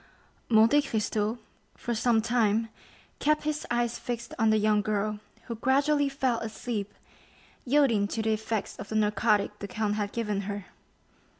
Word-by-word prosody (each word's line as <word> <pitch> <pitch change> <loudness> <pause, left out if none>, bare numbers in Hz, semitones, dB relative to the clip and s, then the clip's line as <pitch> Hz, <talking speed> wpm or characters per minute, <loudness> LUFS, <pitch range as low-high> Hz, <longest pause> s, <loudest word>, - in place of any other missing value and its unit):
Monte 225 +6 +6
Cristo 220 -3 -1 0.4
for 240 - -3
some 225 0 +2
time 225 -1 +2 0.5
kept 305 +1 +2
his 305 0 -2
eyes 240 0 0
fixed 235 -1 -5
on 225 -1 +4
the 215 - +4
young 210 0 +3
girl, 210 0 -1 0.2
who 235 - -5
gradually 280 +5 +2
fell 260 -4 0
asleep, 215 -2 -4 0.7
yielding 250 -7 +3
to 220 +2 -3
the 220 0 +2
effects 220 0 -3
of 200 - -8
the 220 - -4
narcotic 210 0 +2
the 200 - -5
count 215 0 -1
had 205 -1 -2
given 210 -4 -2
her. 200 -1 -4
220 Hz, 155 wpm, -28 LUFS, 210-240 Hz, 0.7 s, Monte